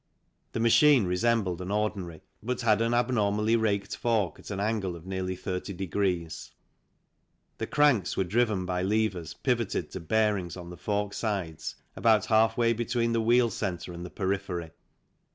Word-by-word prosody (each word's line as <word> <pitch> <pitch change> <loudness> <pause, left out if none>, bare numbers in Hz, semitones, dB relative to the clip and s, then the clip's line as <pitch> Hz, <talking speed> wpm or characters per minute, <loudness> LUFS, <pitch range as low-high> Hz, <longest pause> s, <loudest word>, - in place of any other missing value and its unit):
The - - -2
machine 120 +1 +5
resembled 95 0 +1
an 90 - -5
ordinary, 100 -6 -2 0.2
but 125 +3 -3
had 110 -2 +3
an 115 +1 +1
abnormally 110 -3 +2
raked 100 -3 0
fork 110 -8 0
at - - -11
an 100 -2 -3
angle 100 -4 -1
of 85 0 -12
nearly 95 -1 -3
30. 95 +1 -4
The 90 -2 -6
cranks 145 - +3
were - - +3
driven 105 0 +1
by 90 0 -1
levers 95 -5 -1
pivoted 115 - -1
to - - -5
bearings 100 0 0
on 90 -1 -8
the - - -8
fork 105 -1 -2
sides 95 -8 -3 0.2
about 110 -2 +3
half 110 0 +3
way 115 -1 +3
between 115 0 0
the 115 - +2
wheel 120 +1 +3
centre 90 -3 -4
and 85 0 -7
the 90 - -6
periphery. 95 -4 -3
100 Hz, 155 wpm, -28 LUFS, 90-115 Hz, 0.2 s, machine